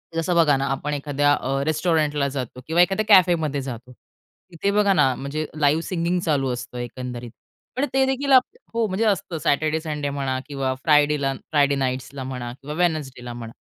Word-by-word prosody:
जसं 165 +2 0
बघा 160 -4 +5
ना, 135 - -1
आपण 150 +2 -2
एखाद्या 145 0 +1
अ, 135 0 -1
रेस्टॉरंटला 155 -2 +1
जातो 130 -2 -5
किंवा 170 +2 +3
एखाद्या 195 +4 +2
कॅफेमध्ये 170 -7 +4
जातो. 125 -2 -7 0.6
तिथे 175 +4 -1
बघा 205 -1 +3
ना, 135 -8 +3
म्हणजे 145 +4 -4
लाईव्ह 150 +2 +3
सिंगिंग 175 0 -1
चालू 145 -6 0
असतं, 125 0 -7
एकंदरीत. 120 -1 -6 0.4
पण 265 +3 +1
ते 265 0 +4
देखील 270 +1 -1
आप 260 -1 +8 0.3
हो, 230 -1 +1
म्हणजे 200 +3 -1
असतं 190 -5 0
सॅटरडे, 155 +2 +1
संडे 150 -3 -3
म्हणा 135 -2 -2
किंवा 135 -2 -2
फ्रायडेला 150 -3 +3 0.2
फ्रायडे 145 -2 +3
नाईट्सला 130 0 -3
म्हणा 125 -2 -5
किंवा 140 +4 -8
वेडनेसडेला 145 -8 -2
म्हणा. 115 -1 -8
145 Hz, 170 wpm, -23 LUFS, 135-170 Hz, 0.6 s, आप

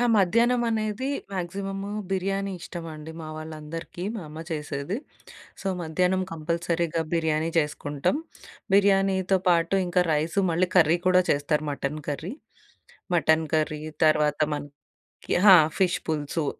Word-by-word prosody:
ఆ! - - +3
మధ్యాహ్నం 230 +6 +3
అనేది 220 +3 -1 0.2
మ్యాక్సిమము 195 +2 -4 0.2
బిర్యానీ 195 +1 -1
ఇష్టమండి 160 -3 -7
మా 155 - -7
వాళ్ళందరికీ 155 +2 -7
మా 220 - -4
అమ్మ 155 +2 -7
చేసేది. 150 +3 -3 0.6
సో, - - -7
మధ్యాహ్నం 180 +3 +1
కంపల్సరీగా 170 +1 -1
బిర్యానీ 160 -1 +1
చేసుకుంటాం. 145 - -1 0.6
బిర్యానీతో 195 -1 +3
పాటు 170 +1 +3
ఇంకా 180 +1 +2
రైసు 155 +5 0
మళ్ళీ 180 +2 +2
కర్రీ 165 -1 +6
కూడా 185 0 +5
చేస్తారు 150 +1 +1
మటను 145 +1 -3
కర్రీ 155 +7 -3 0.8
మటన్ 160 -1 +3
కర్రీ 155 -1 0 0.3
తర్వాత 150 -1 +3 0.2
మనకి 145 -1 -9 0.5
ఆహా! 195 -2 +9 0.2
ఫిష్ 185 -2 +2
పులుసు. 155 0 -1
170 Hz, 120 wpm, -26 LUFS, 155-190 Hz, 0.8 s, ఆహా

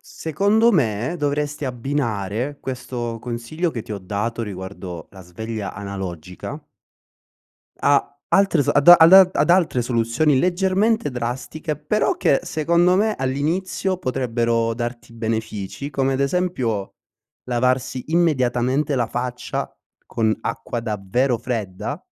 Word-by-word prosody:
Secondo 205 +9 +1
me 125 - 0
dovresti 145 0 -1
abbinare 125 -1 -2
questo 120 -3 -4
consiglio 120 +9 -3
che 115 - -4
ti - - -15
ho 100 - -4
dato, 105 +5 -3
riguardo 95 -4 -7
la 95 - -13
sveglia 110 +3 -6
analogica 95 -3 -6 1.2
a 145 0 +1
altre 195 -6 +3
s - - -5
ad 145 +3 +3
a 175 - +14
al 165 +2 +7
a 190 -1 +10
ad - - +2
altre 170 -8 +3
soluzioni 120 +5 +1
leggermente 190 - +1
drastiche, 125 +6 -4
però 150 +9 0
che 135 - +2
secondo 170 +3 +2
me 215 +1 +2
all'inizio 165 +8 -1
potrebbero 115 -5 0
darti 120 0 -5
benefici, 110 +3 -4
come 135 0 0
ad 130 - -1
esempio, 130 - -1 0.5
lavarsi 125 +1 0
immediatamente 135 -3 +1
la 120 -3 +1
faccia 125 0 -4 0.3
con 110 -1 0
acqua 115 +1 -4
davvero 115 +4 0
fredda 110 -6 -4
125 Hz, 120 wpm, -22 LUFS, 115-155 Hz, 1.2 s, a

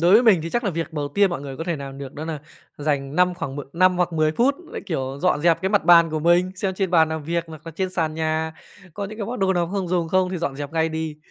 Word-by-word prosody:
đối 175 +3 +4
với 225 - +7
mình 210 -9 +5
thì 165 - -5
chắc 240 +3 -1
là 200 - +1
việc 165 0 -4
đầu 145 -2 -3
tiên 200 +6 +3
mọi 175 - -3
người 135 -2 -7
có 165 - -5
thể 170 -3 -1
làm 135 -1 -8
được 140 -1 -8
đó 155 +2 -6
nà 155 -3 -4 0.4
dành 145 -1 -1
5 180 0 +3
khoảng 145 -6 -5
m - - -3
năm 185 +1 +3
hoặc 175 -1 0
10 155 -1 +2
phút 255 - +2
lại, - - -7
kiểu, 135 -4 -3
dọn 180 -5 +2
dẹp 170 +2 +3
cái 190 - +1
mặt 205 -4 +2
bàn 170 -1 +7
của 155 -1 -2
mình, 175 +3 +3
xem 190 0 -2
trên 190 -2 -1
bàn 160 -3 +5
làm 160 -1 -4
việc 170 +2 -1
hoặc 160 -2 -10
nà 165 - -7
trên 185 +1 -2
sàn 160 -4 -1
nhà, 160 0 -1 0.4
có 200 - -4
những 215 +3 -8
cái 205 - -3
món 245 +2 -4
đồ 190 0 +3
nào 175 -2 0
không 195 -3 -2
dùng 170 -2 0
không 185 +1 +2
thì 185 - -2
dọn 145 -5 -3
dẹp 145 +1 -6
ngay 160 0 +1
đi. 160 -1 -4
165 Hz, 310 wpm, -23 LUFS, 155-185 Hz, 0.4 s, với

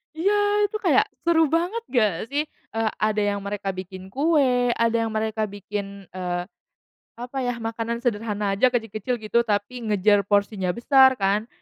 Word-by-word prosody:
Iya 370 +6 +1 0.3
itu 415 +1 -1
kayak 385 +6 +5 0.2
seru 335 -1 +5
banget 365 +8 -1
gak 220 -6 +3 0.2
sih? 290 +1 +1 0.3
Eee, 225 -1 +1
ada 215 0 +1
yang 200 0 -2
mereka 200 0 -4
bikin 185 0 -8
kue, 265 -5 +2
ada 230 0 +2
yang 225 - -2
mereka 220 0 -1
bikin, 200 -1 -6
eee, 180 -1 -2 0.8
apa 245 +3 -6
ya, 245 -1 -2
makanan 230 0 -3
sederhana 210 -3 -1
aja 200 +6 +4
kecil-kecil 225 0 -2
gitu 215 +2 +1
tapi 215 +2 -2
ngejar 205 0 +4
porsinya 200 -2 +1
besar 265 +1 +5
kan, 200 +3 0
220 Hz, 155 wpm, -24 LUFS, 205-250 Hz, 0.8 s, kayak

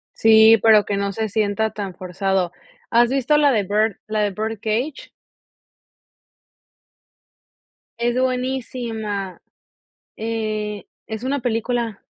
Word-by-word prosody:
Sí, 220 0 +7
pero, 215 -2 +6
que 200 - -2
no 200 0 -1
se 220 +2 -2
sienta 215 +1 0
tan 200 -3 -6
forzado, 185 0 -1 0.4
¿has 235 0 +4
visto 270 +2 +1
la 290 -1 +4
de 215 -5 +1
Bird 210 +1 +1
la 215 0 -1
de 205 - +2
Bird 220 +2 -4
Cage? 240 +7 -2 2.9
Es 240 +1 0
buenísima. 240 -6 -3 0.8
Eh, 215 -2 -3 0.2
es 220 +2 -6
una 280 +2 -1
película. 235 -2 -2
220 Hz, 115 wpm, -21 LUFS, 205-240 Hz, 2.9 s, Sí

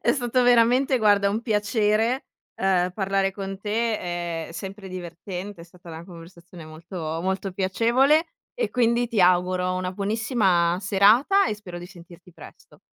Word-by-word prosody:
è - - +2
stato 250 -1 0
veramente, 245 +2 +4
guarda, 205 -2 +3
un 220 +3 -2
piacere, 215 +3 0 0.3
ehm, 185 -2 +1
parlare 195 -1 0
con 195 0 -7
te, 175 -7 -3
è - - -12
sempre 195 +3 -8
divertente, 180 +1 -7
è - - -11
stata 175 0 -17
una 160 +1 -9
conversazione 170 -1 -13
molto 160 0 -6
molto 190 +1 -2
piacevole 240 - +2 0.3
e - - -2
quindi 240 0 +1
ti 225 -4 0
auguro 180 0 +2
una 185 0 -3
buonissima 200 -4 +1
serata 215 - +4
e 215 - -2
spero 180 -4 -9
di 175 - -9
sentirti 175 -1 -16
presto. - - -16
195 Hz, 150 wpm, -24 LUFS, 180-225 Hz, 0.3 s, veramente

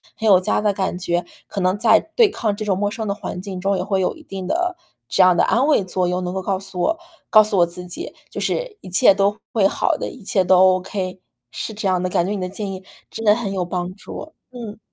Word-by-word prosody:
很 220 - -2
有 190 -3 +7
家 185 - 0
的 205 -1 +2
感 190 -2 -2
觉。 175 -1 -1 0.2
可 200 - -5
能 185 +1 +2
在 220 -1 +6 0.2
对 460 -4 +6
抗 215 - -1
这 215 - -5
种 190 -3 +1
陌 205 0 0
生 220 -1 -4
的 200 - 0
环 185 -3 -6
境 190 -2 -6
中， 195 +1 +1
也 180 - -1
会 195 -1 0
有 - - 0
一 315 - -15
定 190 -7 -6
的 355 - 0 0.3
这 195 - +2
样 180 -1 +6
的 - - +4
安 250 +4 +3
慰 290 -10 +4
作 185 -1 -1
用， 180 +1 -1
能 180 +1 -3
够 190 - -2
告 190 0 -1
诉 195 -2 -6
我 325 - +1 0.3
告 215 -1 +8
诉 210 -2 -1
我 170 - +6
自 180 +1 -8
己， 175 - -7 0.2
就 - - -5
是 - - -2
一 185 - -10
切 190 +2 +6
都 200 +1 +1 0.2
会 200 -4 +4
好 - - 0
的， - - -4
一 250 - -12
切 190 -1 +2
都 185 0 +5 0.2
OK。 185 0 -5 0.4
是 - - -4
这 205 -1 -2
样 185 -1 +1
的， 185 - -1
感 175 - +1
觉 195 - -2
你 200 -3 -2
的 180 - -3
建 195 0 -4
议 190 0 -8 0.3
真 225 - -6
的 210 0 +5
很 210 -5 -3
有 185 -2 -1
帮 180 +1 -3
助。 310 +9 -9 0.2
嗯。 225 -4 -8
195 Hz, 290 characters per minute, -21 LUFS, 185-215 Hz, 0.4 s, 告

